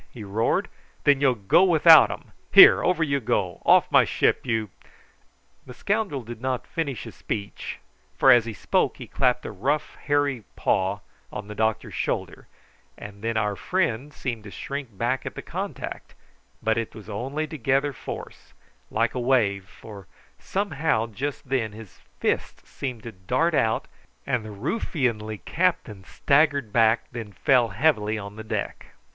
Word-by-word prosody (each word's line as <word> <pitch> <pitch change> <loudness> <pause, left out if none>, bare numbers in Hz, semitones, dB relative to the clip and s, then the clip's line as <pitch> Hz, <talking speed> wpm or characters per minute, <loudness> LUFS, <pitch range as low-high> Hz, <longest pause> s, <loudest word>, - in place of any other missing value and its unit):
he 115 - -10
roared; 105 +3 0 0.4
"then 140 -1 +4
you'll 130 -3 +4
go 100 - +3
without 165 -3 +7
'em. - - -8 0.2
Here, - - +9
over 180 -2 +2
you 140 -3 0
go; 95 -7 -1
off - - +5
my - - +6
ship, - - 0
you 110 -4 -1 0.5
" - - -39
The 125 - -10
scoundrel 200 - -1
did 115 0 -9
not 130 -1 -2
finish 140 - -4
his - - -9
speech, 100 -1 -5 0.4
for 135 - +6
as 120 -3 +6
he 115 - -5
spoke 100 - 0
he - - -8
clapped 125 -2 0
a - - -4
great 100 - -13
rough 145 +4 0
hairy 145 -5 +1
paw 95 +2 0 0.3
on 105 - -7
the 105 - -7
doctor's 110 0 -1
shoulder, - - -3 0.5
and 100 -1 -10
then 115 0 -1
our 105 -1 0
friend 145 - -1
seemed 120 -6 -5
to - - -8
shrink 135 -1 -6
back 125 +4 -1
at - - -6
the - - -7
contact; - - -6 0.5
but 110 +1 +1
it 115 - -5
was 110 -3 -11
only 130 +9 -3
to 155 +1 -8
gather 135 +3 +1
force, - - -9 0.3
like 115 +2 0
a 125 - -3
wave, 115 -7 +1
for, 100 0 -13 0.3
somehow, 160 - -1
just 130 +6 -5
then 120 -5 -1
his 110 -3 -13 0.2
fist - - -2
seemed 125 -5 -6
to 115 - -7
dart 125 - 0
out, 110 -6 +1 0.4
and 120 -3 -1
the 110 - -8
ruffianly 115 - -2
captain 160 - -1
staggered 140 -5 +1
back 115 0 +4
and 115 -2 -5
then - - -16
fell 125 +4 +3
heavily 110 -2 +1
on 100 0 -8
the 110 - -8
deck. 110 - -5
120 Hz, 170 wpm, -25 LUFS, 110-140 Hz, 0.5 s, Here